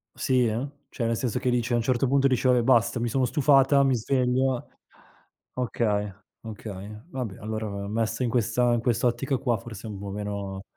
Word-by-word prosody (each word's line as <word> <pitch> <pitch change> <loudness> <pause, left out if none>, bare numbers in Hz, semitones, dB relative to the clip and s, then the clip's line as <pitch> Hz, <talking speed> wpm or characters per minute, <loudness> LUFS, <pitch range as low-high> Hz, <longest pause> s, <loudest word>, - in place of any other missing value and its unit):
Sì 125 -2 +2
eh, 115 +5 -1 0.2
cioè 120 - -3
nel 115 0 0
senso 125 0 -1
che 125 0 0
dice 125 0 0
a - - +4
un 120 - +1
certo 125 +2 +1
punto 135 +1 +3
dice:" 130 -1 +2
Vabbe' 125 -1 +4
basta 115 -1 +3
mi 120 0 -1
sono 130 +3 +1
stufata 140 +1 +4
mi 135 -1 +3
sveglio". 125 +1 0 0.9
Okay, 105 -5 -1 0.3
okay 105 -1 -8
vabbè 125 - -5
allora, 110 +1 -4
ehm, 100 -1 -5
messo 115 +2 -1
in 120 - 0
questa 120 +1 +2
in 120 - +1
quest'ottica 120 +3 0
qua 120 -2 0
forse 110 0 -9
è - - -5
un 100 - -7
po' 100 0 -6
meno 100 -1 -5
120 Hz, 195 wpm, -26 LUFS, 110-125 Hz, 0.9 s, a